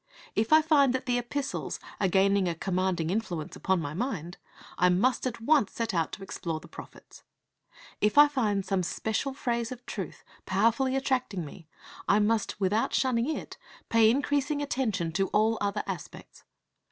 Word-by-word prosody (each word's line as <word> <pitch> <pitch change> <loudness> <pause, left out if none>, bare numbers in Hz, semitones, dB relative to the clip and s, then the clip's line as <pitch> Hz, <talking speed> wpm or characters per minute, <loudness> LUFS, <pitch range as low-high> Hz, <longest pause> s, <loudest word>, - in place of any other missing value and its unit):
If 220 +4 0
I 310 0 +7
find 285 -5 +4
that 260 - -3
the 245 -1 +1
Epistles 275 +4 -4 0.2
are 195 - +2
gaining 195 +1 +3
a 170 - -1
commanding 180 -2 -1
influence 180 -7 -3
upon 190 -1 0
my 145 -2 -4
mind, 180 - -4 0.4
I 180 - +5
must 240 +9 +2
at 240 -2 -5
once 265 -2 +2
set 230 -2 -2
out 165 -2 0
to 195 - -7
explore 165 -4 -4
the - - -14
prophets. - - -13 0.8
If 210 +3 +1
I 295 0 +10
find 215 -9 0
some 195 -2 0
special 220 +9 -2
phase 235 -3 -2
of 250 -1 -9
truth - - -6 0.2
powerfully 230 +7 +2
attracting 255 - -1
me, 160 +2 -12 0.4
I 200 - +4
must, 215 -1 +1
without 205 +3 +1
shunning 255 0 +1
it, 315 - -5 0.3
pay 225 -1 +5
increasing 285 +3 0
attention 220 - -1
to 195 +3 0
all 220 +1 +2
other 205 +1 -1
aspects. - - -8
220 Hz, 165 wpm, -28 LUFS, 190-260 Hz, 0.8 s, I